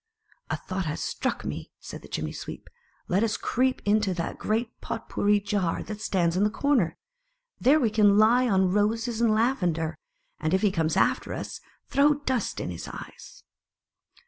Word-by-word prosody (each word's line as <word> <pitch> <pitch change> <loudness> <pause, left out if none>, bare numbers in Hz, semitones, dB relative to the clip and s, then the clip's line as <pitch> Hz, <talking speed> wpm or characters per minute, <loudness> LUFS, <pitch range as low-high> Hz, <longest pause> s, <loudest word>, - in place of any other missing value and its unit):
" - - -32
A - - -1
thought 190 -1 -4
has 150 - -3
struck - - -2
me," - - -5
said - - -9
the - - -13
Chimney 80 -1 -3
sweep; - - -8 0.4
"let 190 +3 +2
us 225 -2 +1
creep 255 +2 0
into 205 -2 +2
the 165 -1 -3
great 225 +2 -2
Pot 230 - -5
pourri 205 0 +2
Jar 200 -4 -1
that 215 -1 -7
stands 175 -5 +1
in 190 - +2
the 210 - +3
corner; 250 - +1 0.6
there 285 +5 +5
we 230 -6 +1
can 205 -2 +5
lie 240 +4 +5
on 190 -2 +3
roses 225 +3 0
and 235 - +4
laven 215 -5 +2
der, 160 0 -3 0.4
and 160 +4 +1
if 190 - 0
he 205 - +4
comes 160 -3 0
after - - +1
us, - - -6 0.2
throw 290 +2 +4
dust 260 -6 -2
in - - -3
his 85 - -7
eyes." - - -10
210 Hz, 185 wpm, -27 LUFS, 185-230 Hz, 0.6 s, there